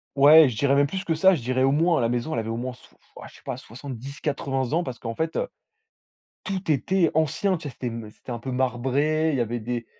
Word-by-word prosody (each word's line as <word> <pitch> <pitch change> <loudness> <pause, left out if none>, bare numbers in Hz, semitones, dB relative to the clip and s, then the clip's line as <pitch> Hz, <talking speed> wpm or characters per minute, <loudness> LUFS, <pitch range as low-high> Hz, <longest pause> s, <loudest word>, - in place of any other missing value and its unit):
Ouais, 145 +1 +8
je 115 - -6
dirais 140 +3 +2
même 140 0 +4
plus 190 +5 -4
que 165 - 0
ça. 190 +4 +5
Je 150 - -5
dirais 130 +2 -1
au 135 - +4
moins 165 +3 +2
la 115 - +1
maison, 120 +6 -2
elle - - 0
avait 110 0 -4
au 115 - -2
moins 125 +1 -4
soi 125 - -20
f - - -32
ouais - - -9
je - - -19
sais - - -17
pas - - -4
70-80 135 +2 -4
ans. 170 +2 +2
Parce 130 -7 -6
qu'en 115 -1 -5
fait, 160 +4 -2
heu, - - -1 1.0
tout 190 -3 -3
était 165 +4 +2
ancien. 160 +5 +1
Tu 155 - -7
vois? - - -8
C'était 125 - -7
m 115 -2 -6
c'était 115 +3 -10
un 120 - -4
peu 130 +3 -6
marbré. 135 +5 +1
Il 145 - 0
y - - 0
avait 120 +1 -2
des 120 +1 -4
135 Hz, 265 wpm, -25 LUFS, 120-160 Hz, 1.0 s, Ouais